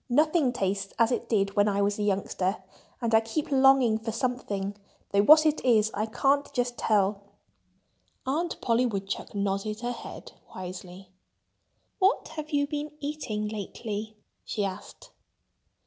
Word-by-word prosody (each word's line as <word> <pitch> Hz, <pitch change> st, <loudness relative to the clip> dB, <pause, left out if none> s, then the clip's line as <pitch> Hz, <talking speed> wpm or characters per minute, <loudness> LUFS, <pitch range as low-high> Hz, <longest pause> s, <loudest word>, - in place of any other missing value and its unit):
"Nothing 305 Hz, +1 st, +3 dB
tastes 195 Hz, -4 st, -2 dB
as 230 Hz, 0 st, +3 dB
it 240 Hz, -1 st, -2 dB
did 200 Hz, -3 st, +1 dB
when 205 Hz, 0 st, +4 dB
I 200 Hz, -1 st, +1 dB
was 205 Hz, +1 st, 0 dB
a -, -, -1 dB
youngster. 195 Hz, -1 st, -1 dB, 0.4 s
And 230 Hz, -1 st, 0 dB
I 220 Hz, -, +8 dB
keep 255 Hz, +7 st, -3 dB
longing 265 Hz, -4 st, +5 dB
for 225 Hz, 0 st, -4 dB
something, 215 Hz, -5 st, -2 dB, 0.4 s
though 200 Hz, -, +4 dB
what 310 Hz, +8 st, +7 dB
it 310 Hz, 0 st, +1 dB
is 220 Hz, -4 st, +4 dB
I 215 Hz, +2 st, -1 dB
can't 275 Hz, +6 st, +1 dB
just 245 Hz, -2 st, -1 dB
tell." 200 Hz, -3 st, +1 dB, 1.0 s
Aunt 325 Hz, +6 st, -1 dB
Polly 240 Hz, +1 st, +2 dB
Woodchuck 195 Hz, -1 st, -4 dB
nodded 200 Hz, +2 st, -2 dB
her 245 Hz, 0 st, -2 dB
head -, -, -9 dB, 0.2 s
wisely. 185 Hz, 0 st, -8 dB, 0.9 s
"What 390 Hz, +4 st, +2 dB
have 305 Hz, -1 st, -6 dB
you 290 Hz, -2 st, +2 dB
been 295 Hz, +1 st, -4 dB
eating 280 Hz, -8 st, -3 dB
lately?" 215 Hz, +1 st, -5 dB, 0.3 s
she 205 Hz, -2 st, -2 dB
asked. 195 Hz, +1 st, -8 dB
220 Hz, 145 wpm, -27 LUFS, 200-270 Hz, 1.0 s, I